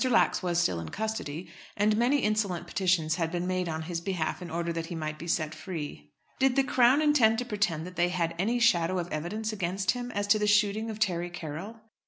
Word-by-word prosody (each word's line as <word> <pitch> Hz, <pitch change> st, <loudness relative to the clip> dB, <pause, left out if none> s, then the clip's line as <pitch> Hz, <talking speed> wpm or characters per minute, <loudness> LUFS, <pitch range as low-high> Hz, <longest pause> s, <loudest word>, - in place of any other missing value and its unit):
Lax 245 Hz, -, +3 dB
was 175 Hz, -2 st, -1 dB
still 130 Hz, -, +2 dB
in 85 Hz, -, -6 dB
custody, 185 Hz, -7 st, -4 dB, 0.3 s
and 210 Hz, +1 st, +3 dB
many 250 Hz, +5 st, +2 dB
insolent 210 Hz, -5 st, 0 dB
petitions 175 Hz, -4 st, +1 dB
had 165 Hz, -2 st, -1 dB
been 175 Hz, 0 st, -2 dB
made 185 Hz, -1 st, -1 dB
on 160 Hz, 0 st, -3 dB
his 165 Hz, 0 st, -4 dB
behalf 180 Hz, -2 st, -2 dB
in 175 Hz, -, -6 dB
order 170 Hz, +1 st, -2 dB
that 165 Hz, 0 st, -4 dB
he 175 Hz, -, -5 dB
might 155 Hz, -1 st, -4 dB
be 170 Hz, -, -7 dB
set 155 Hz, -2 st, 0 dB
free. 155 Hz, -, -7 dB, 0.3 s
"Did 265 Hz, -1 st, +3 dB
the 275 Hz, -, +4 dB
Crown 260 Hz, +3 st, +4 dB
intend 250 Hz, -7 st, +4 dB
to 245 Hz, -, -2 dB
pretend 200 Hz, -8 st, -1 dB
that 180 Hz, 0 st, -10 dB
they 175 Hz, 0 st, +3 dB
had 170 Hz, -2 st, -1 dB
any 225 Hz, +6 st, +1 dB
shadow 185 Hz, -6 st, +3 dB
of 175 Hz, -1 st, -3 dB
evidence 215 Hz, +8 st, -3 dB
against 190 Hz, -1 st, 0 dB
him 245 Hz, 0 st, -5 dB
as 205 Hz, 0 st, -1 dB
to 210 Hz, +1 st, +4 dB
the 210 Hz, -, +1 dB
shooting 210 Hz, +1 st, +2 dB
of 215 Hz, -, -5 dB
Terry 175 Hz, -5 st, 0 dB
Carroll?" 175 Hz, +6 st, -7 dB
180 Hz, 225 wpm, -28 LUFS, 165-215 Hz, 0.3 s, the